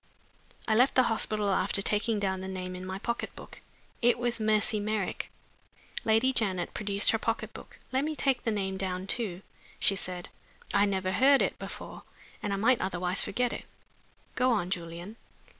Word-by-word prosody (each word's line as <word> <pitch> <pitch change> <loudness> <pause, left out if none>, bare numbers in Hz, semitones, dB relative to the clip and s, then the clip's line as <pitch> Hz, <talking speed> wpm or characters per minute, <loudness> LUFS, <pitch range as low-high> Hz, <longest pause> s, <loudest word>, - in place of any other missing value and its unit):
I 220 - +3
left 250 +5 +4
the 255 - +6
hospital 210 -2 0
after 195 - +1
taking 210 +2 +1
down 190 -2 -1
the 190 - -5
name 185 -1 -5
in 185 0 -7
my 190 0 -3
pocket 235 +4 -3
book. - - -11 0.4
It 240 0 +4
was 240 -1 -1
"Mercy 215 0 +2
Merrick."'" 210 -2 -2 0.7
Lady 225 +4 +3
Janet 190 -7 0
produced 200 -1 +4
her 225 - +1
pocket 225 +1 -2
book. - - -11
"Let 260 +1 +1
me 310 +1 -2
take 270 -3 +2
the - - 0
name 195 -3 -1
down 185 -1 -2
too," 195 -3 -1 0.4
she 195 - +3
said. 180 -2 -4 0.4
"I 200 0 +5
never 190 -1 0
heard 270 +8 +5
it - - -2
before, - - -7 0.4
and 205 - -2
I - - +1
might 230 +5 +3
otherwise 180 0 0
forget 245 +4 0
it. - - -6 0.7
Go 255 0 +2
on, 185 -6 0
Julian." 175 +4 -5
205 Hz, 175 wpm, -29 LUFS, 190-230 Hz, 0.7 s, the